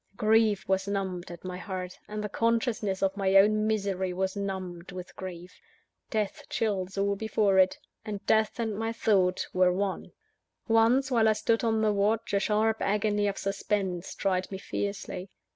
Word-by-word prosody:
_ -, -, -29 dB
Grief 215 Hz, -1 st, +3 dB
was 190 Hz, +1 st, +1 dB
numbed 190 Hz, -3 st, -3 dB
at 175 Hz, -1 st, -10 dB
my 180 Hz, 0 st, -4 dB
heart; 185 Hz, -1 st, -6 dB
and 210 Hz, 0 st, -4 dB
the -, -, -1 dB
consciousness 225 Hz, -3 st, 0 dB
of 195 Hz, 0 st, +1 dB
my 195 Hz, -1 st, +1 dB
own 215 Hz, +2 st, +5 dB
misery 195 Hz, -4 st, -1 dB
was 190 Hz, +1 st, -1 dB
numbed 190 Hz, -3 st, -5 dB
with 180 Hz, 0 st, -8 dB
grief. 180 Hz, -1 st, -9 dB, 0.5 s
Death 210 Hz, -3 st, -2 dB
chills 195 Hz, -4 st, -1 dB
all 200 Hz, 0 st, +1 dB
before 205 Hz, -2 st, +2 dB
it 185 Hz, 0 st, +4 dB, 0.3 s
and 205 Hz, -2 st, -6 dB
Death 220 Hz, +1 st, +2 dB
and 220 Hz, -3 st, -1 dB
my 225 Hz, +2 st, -2 dB
Thought 195 Hz, -5 st, +2 dB
were 185 Hz, 0 st, +4 dB
one. 190 Hz, +1 st, -2 dB, 0.6 s
Once, 235 Hz, +4 st, +3 dB
while 225 Hz, -3 st, +4 dB
I -, -, +4 dB
stood 225 Hz, +2 st, 0 dB
on 220 Hz, -1 st, +1 dB
the 215 Hz, -1 st, +3 dB
watch, 210 Hz, +2 st, 0 dB
a 200 Hz, -, +4 dB
sharp 215 Hz, +2 st, +1 dB
agony 205 Hz, 0 st, +1 dB
of 200 Hz, -, -2 dB
suspense 195 Hz, -2 st, -2 dB
tried 185 Hz, -1 st, -1 dB
me 190 Hz, -, -4 dB
fiercely. 200 Hz, -1 st, -4 dB
200 Hz, 175 wpm, -28 LUFS, 190-215 Hz, 0.6 s, own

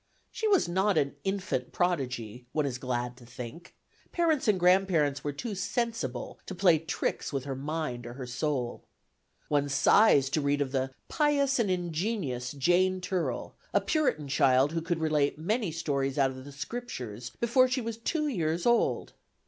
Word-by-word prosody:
She 440 Hz, -, -1 dB
was 390 Hz, -, +4 dB
not 190 Hz, +2 st, +2 dB
an 140 Hz, -2 st, +1 dB
infant 195 Hz, -10 st, -2 dB
prodigy, 125 Hz, -9 st, -2 dB
one 150 Hz, -2 st, +1 dB
is 130 Hz, -3 st, -3 dB
glad 125 Hz, -2 st, -2 dB
to 125 Hz, -, -15 dB
think; 125 Hz, +8 st, -9 dB, 0.4 s
parents 320 Hz, -7 st, +1 dB
and 205 Hz, -3 st, +3 dB
grandparents 175 Hz, -6 st, +3 dB
were 145 Hz, -, -1 dB
too 215 Hz, -, -5 dB
sensible 200 Hz, -, -3 dB
to 190 Hz, -, -5 dB
play 175 Hz, -3 st, +4 dB
tricks 165 Hz, +1 st, -2 dB
with 135 Hz, -3 st, -2 dB
her 135 Hz, -1 st, -4 dB
mind 140 Hz, -4 st, -3 dB
or 120 Hz, -, -7 dB
her 130 Hz, 0 st, -6 dB
soul. 125 Hz, -1 st, -2 dB, 0.7 s
One 145 Hz, -1 st, +1 dB
sighs 140 Hz, -1 st, +5 dB
to 155 Hz, -, +1 dB
read 140 Hz, 0 st, +1 dB
of 140 Hz, -2 st, -1 dB
the 135 Hz, -1 st, 0 dB, 0.2 s
"pious 280 Hz, -3 st, +2 dB
and 220 Hz, -4 st, +2 dB
ingenious 170 Hz, -, -2 dB
Jane 180 Hz, +6 st, +2 dB
Turell," 180 Hz, -1 st, -2 dB, 0.2 s
a -, -, +7 dB
Puritan 280 Hz, -, 0 dB
child 135 Hz, 0 st, +4 dB
who 165 Hz, 0 st, -1 dB
could 170 Hz, +1 st, -1 dB
relate 150 Hz, -3 st, +1 dB
many 205 Hz, +4 st, -1 dB
stories 140 Hz, -4 st, -1 dB
out 135 Hz, -2 st, +3 dB
of 130 Hz, 0 st, -10 dB
the 145 Hz, -, -9 dB
Scriptures 130 Hz, -, -6 dB
before 255 Hz, +2 st, +4 dB
she 255 Hz, +1 st, 0 dB
was 230 Hz, -1 st, -4 dB
two 305 Hz, +6 st, -1 dB
years 170 Hz, -, -1 dB
old. 240 Hz, 0 st, +2 dB
155 Hz, 170 wpm, -29 LUFS, 135-195 Hz, 0.7 s, a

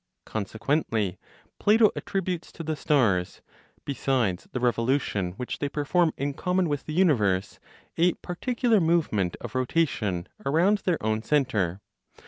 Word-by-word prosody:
Consequently, 110 Hz, -, -1 dB, 0.4 s
Plato 215 Hz, +1 st, +5 dB
attributes 185 Hz, -3 st, -3 dB
to 165 Hz, -, -7 dB
the 155 Hz, 0 st, -2 dB
stars, 110 Hz, -12 st, +1 dB, 0.4 s
besides 130 Hz, -9 st, 0 dB
the 125 Hz, -, -2 dB
revolution 120 Hz, -6 st, 0 dB
which 125 Hz, +6 st, -5 dB
they 145 Hz, -, -1 dB
perform 160 Hz, +4 st, +1 dB
in 140 Hz, +1 st, -2 dB
common 180 Hz, +4 st, 0 dB
with 145 Hz, -2 st, -3 dB
the 155 Hz, -, -4 dB
universe, 105 Hz, -, +2 dB, 0.4 s
a 175 Hz, +1 st, +4 dB
particular 235 Hz, +4 st, 0 dB
movement 150 Hz, -, +1 dB
of -, -, -7 dB
rotation 125 Hz, -, 0 dB, 0.2 s
around 170 Hz, +9 st, +3 dB
their 180 Hz, -4 st, 0 dB
own 110 Hz, 0 st, +1 dB
centre. 110 Hz, -, 0 dB
140 Hz, 125 wpm, -26 LUFS, 110-170 Hz, 0.4 s, Plato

